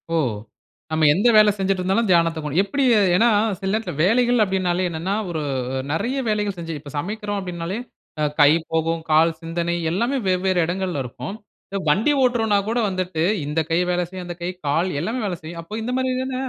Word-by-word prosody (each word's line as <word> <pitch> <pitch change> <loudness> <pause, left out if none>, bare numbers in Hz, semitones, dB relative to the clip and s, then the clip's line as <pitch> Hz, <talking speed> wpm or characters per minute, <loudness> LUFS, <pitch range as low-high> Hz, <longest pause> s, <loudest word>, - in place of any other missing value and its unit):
ஓ! - - +3 0.7
நம்ம 155 -1 +3
எந்த 200 +9 +2
வேலை 215 0 +7
செஞ்சிட்டு 195 -1 0
இருந்தாலும் 195 +5 +1
தியானத்த 165 -2 +3
கொண் 150 -1 -4
எப்படி? 275 +8 -1 0.3
ஏன்னா, 230 +6 +4 0.3
சில 190 - -3
நேரத்துல 220 +1 -2
வேலைகள் 240 +4 +3
அப்பிடினாலே 185 -2 0
என்னன்னா, 170 +4 -2
ஒரு 160 -2 -3 0.3
அ 130 - -1
நிறைய 230 - -1
வேலைகள் 210 -2 0
செஞ்சு 165 -2 -5
இப்ப 145 0 -11
சமைக்கிறோம் 205 +5 -3
அப்பிடினாலே, 180 0 -4 0.4
அ - - +2 0.2
கை 145 - +8 0.2
போகும், 165 0 0
கால், 160 +2 +5
சிந்தனை 170 +1 -2 0.2
எல்லாமே 235 +10 0
வெவ்வேறு 185 0 +2
இடங்கள்ல 180 -3 -2
இருக்கும். 125 - -7 0.3
இந்த 195 - -3
வண்டி 215 - +3
ஓட்டுறோன்னாக் 225 -5 +2
கூட 235 +2 0
வந்துட்டு, 185 -3 -2 0.2
இந்த 150 +3 -1
கை 165 - +3
வேலை 180 0 0
செய்யும், 185 -1 -7
அந்த 175 -1 -6
கை, 175 - -1 0.2
கால் 165 +6 +1
எல்லாமே 225 +9 -2
வேலை 180 -3 -3
செய்யும். 165 +1 -7
அப்ப 210 +6 -6
இந்தமாரி 255 +2 -1
தான, 260 0 -4
185 Hz, 180 wpm, -22 LUFS, 165-210 Hz, 0.7 s, கை